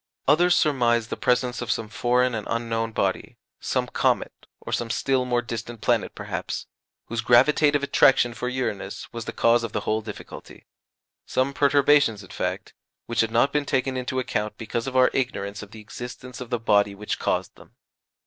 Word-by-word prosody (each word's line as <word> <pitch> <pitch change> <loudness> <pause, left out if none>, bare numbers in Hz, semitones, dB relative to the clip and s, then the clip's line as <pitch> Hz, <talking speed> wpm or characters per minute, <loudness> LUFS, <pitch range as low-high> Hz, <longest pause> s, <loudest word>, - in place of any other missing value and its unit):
Others 175 +5 +5
surmised 120 -6 +2
the - - -1
presence 125 0 0
of 120 - -5
some 115 -2 -1
foreign 125 +2 +1
and 110 -2 -4
unknown 115 -1 -1
body, - - -2 0.2
some - - -1
comet, - - -1
or - - -7
some 120 - -1
still 130 +1 +1
more 120 -1 0
distant 115 0 -6
planet - - 0
perhaps, - - -5 0.4
whose 115 -1 -3
gravitative 145 +5 +4
attraction 130 -3 +4
for 125 +1 -3
Uranus 125 -6 -4
was 115 -1 -5
the - - -4
cause 115 0 +3
of 115 - -5
the 105 - -1
whole 110 +1 -1
difficulty 105 -1 -10 0.6
some 130 +2 0
perturbations, 140 -6 +3
in 95 - -14
fact, - - -4 0.3
which 115 - -3
had 115 - 0
not 120 +5 +2
been 150 -1 +1
taken 130 0 0
into 130 0 -3
account 105 -4 -2
because 115 +2 -4
of 130 -1 -2
our 130 0 +5
ignorance 100 -6 -2
of 105 - -10
the 110 +1 -11
existence 125 +3 -9
of 125 - -7
the 120 - 0
body 100 -3 +2
which 105 +1 -4
caused - - -1
them. - - -18
120 Hz, 180 wpm, -24 LUFS, 115-130 Hz, 0.6 s, Others